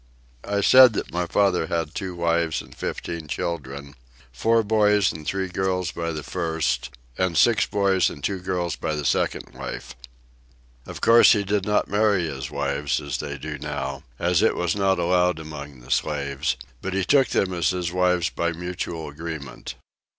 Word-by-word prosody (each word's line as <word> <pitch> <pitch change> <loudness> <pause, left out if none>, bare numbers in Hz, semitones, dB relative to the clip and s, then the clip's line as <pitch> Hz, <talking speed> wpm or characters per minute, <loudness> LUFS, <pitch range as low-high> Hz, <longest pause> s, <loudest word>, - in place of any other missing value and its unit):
I 100 0 0
said 130 +3 +8
that - - -4
my 90 0 -1
father 95 -5 +2
had 85 -1 -2
two 95 -3 -4
wives 85 -1 +1
and - - -15
fifteen 85 -2 -5
children: 70 -4 -4 0.4
four 115 - +2
boys 105 -2 +3
and 80 -2 -9
three 95 -1 -1
girls 90 -1 -1
by 85 -1 -3
the 75 -2 -5
first, 80 -8 -1 0.3
and 95 -3 +1
six 115 +7 +4
boys 100 -2 +2
and 70 - -10
two 100 +2 -1
girls 90 -2 -2
by 80 - -3
the 75 -1 -4
second - - 0
wife. - - -7 0.9
Of - - -8
course 115 +1 +7
he 105 -2 +1
did 100 -1 0
not 105 - +2
marry 100 -2 +2
his 65 -4 -5
wives - - -1
as 70 -2 -4
they 70 -1 -5
do 65 - -6
now, 70 0 -4 0.2
as 85 +2 +2
it - - +3
was 90 0 0
not 95 -1 +2
allowed 90 0 +2
among 75 -4 -9
the 65 +2 -11
slaves, 70 -1 -1 0.2
but 95 0 -3
he 95 -1 0
took 140 +2 +4
them 95 -1 0
as 85 -4 +1
his 90 -2 -2
wives 90 -1 +1
by 85 0 -1
mutual 85 -1 -5
agreement. 75 -1 -7
85 Hz, 175 wpm, -24 LUFS, 75-95 Hz, 0.9 s, said